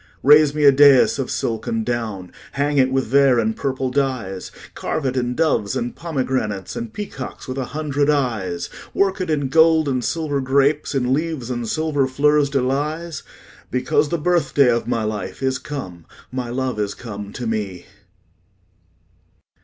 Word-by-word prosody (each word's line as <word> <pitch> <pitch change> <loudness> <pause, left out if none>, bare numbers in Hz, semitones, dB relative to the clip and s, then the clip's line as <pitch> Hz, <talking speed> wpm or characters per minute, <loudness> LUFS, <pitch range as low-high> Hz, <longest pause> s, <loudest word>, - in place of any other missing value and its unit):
Raise 150 +1 +6
me 150 - 0
a 140 - +9
daïs 140 -1 +6
of 135 - -2
silk 115 -2 -2
and 115 -1 -1
down; 110 -7 -3 0.2
Hang 145 +1 +1
it 130 0 +3
with 135 0 +1
vair 135 +1 +4
and 110 -1 +1
purple 130 -1 -2
dyes; 125 -9 -2
10 - - -19
Carve 155 - -3
it 130 -1 -1
in 125 -1 -1
doves 115 -11 +1
and 120 +1 -3
pomegranates, 130 - -3
And 235 -1 -5
peacocks 200 - -7
with 130 +1 -4
a 130 - -2
hundred 145 +1 -1
eyes; 115 -12 -1 0.3
Work 195 -1 +1
it 180 - -3
in 145 -3 0
gold 160 +1 +4
and 130 -3 -1
silver 150 -1 -1
grapes, 140 +3 +1
In 130 -1 +1
leaves 150 -5 -2
and 120 -2 -3
silver 150 -2 0
fleurs 145 +2 +2
de 135 -2 0
lys; 150 +4 -2 0.5
Because 135 +3 +1
the 170 - 0
birthday 160 -5 +2
of 115 0 -1
my 115 - 0
life 105 -3 -4
15 135 - -1
Is 130 -1 -1
come, 95 - -7 0.3
my 125 -2 -4
love 125 -2 -2
is 100 -1 -2
come 105 -3 -8
to 125 - -5
me. 105 -5 -3
135 Hz, 175 wpm, -21 LUFS, 120-150 Hz, 0.5 s, a